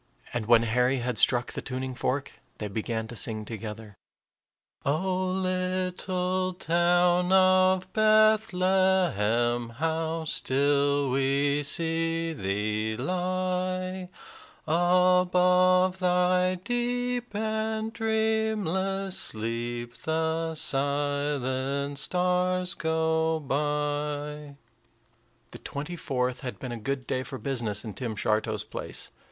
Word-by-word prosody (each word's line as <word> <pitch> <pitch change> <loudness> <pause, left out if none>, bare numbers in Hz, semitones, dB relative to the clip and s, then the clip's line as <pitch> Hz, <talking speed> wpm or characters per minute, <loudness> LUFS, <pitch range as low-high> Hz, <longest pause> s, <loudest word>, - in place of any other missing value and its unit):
And 120 -3 -2
when 115 -1 +6
Harry 125 +3 +2
had 125 0 -1
struck 120 -1 +3
the - - -4
tuning 130 0 -4
fork, 135 +2 -3 0.2
they 105 - -4
began 110 +2 -3
to 120 - -7
sing 110 -1 +2
together, 110 -1 -7 0.9
"O 185 +6 0
little 185 0 -1
town 175 +1 +2
of 185 0 +4
Bethlehem, 185 - +3
How 160 +5 -2
still 140 -1 +1
we 140 +2 +1
see 165 +2 0
thee 105 0 -2
lie! 185 +3 -2 0.6
Above 180 +2 +3
thy 180 0 +2
deep 245 +3 -2
and 220 +1 -2
dreamless 220 -4 0
sleep 120 +2 -3
The 160 +2 -1
silent 140 -1 -1
stars 180 +1 0
go 160 0 0
by." 145 0 -2 1.0
The - - -10
twenty 150 +5 -5
fourth 130 -6 -2
had 125 -3 -5
been 125 - -6
a 120 - -4
good 130 +4 -3
day 130 - -1
for 130 +1 -7
business 120 -7 -2
in 110 - -6
Tim 115 +2 -4
Shartow's 110 +1 0
place. 110 - -7
160 Hz, 100 wpm, -27 LUFS, 130-185 Hz, 1.0 s, when